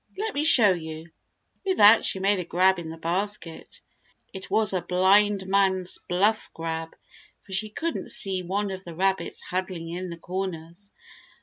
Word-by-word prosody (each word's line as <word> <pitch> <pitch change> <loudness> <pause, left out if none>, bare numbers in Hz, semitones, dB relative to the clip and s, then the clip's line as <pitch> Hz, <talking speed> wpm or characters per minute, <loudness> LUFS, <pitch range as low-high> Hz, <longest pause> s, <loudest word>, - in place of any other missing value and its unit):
Let 435 +2 -3
me 290 - -1
show 235 -10 +7
you." 160 -1 -6 0.5
With 380 -1 -1
that 210 +2 +7
she - - +1
made 195 +1 +1
a - - -2
grab 185 +2 +2
in 165 -2 -7
the 165 - -8
basket. 175 +1 -4 0.5
It 190 -1 -9
was 215 -3 +2
a 185 - 0
blind 190 +3 +3
man's 190 -1 0
bluff 205 +5 +1
grab, 165 0 -5 0.5
for - - -17
she 215 +3 -1
couldn't 330 +9 -4
see 190 -2 -1
one 195 +3 -2
of 190 0 -7
the 170 -3 -9
rabbits 190 +2 -1
huddling 180 -2 -4
in 180 +2 -5
the 170 - -7
corners. 180 +1 -6
190 Hz, 170 wpm, -25 LUFS, 170-205 Hz, 0.5 s, show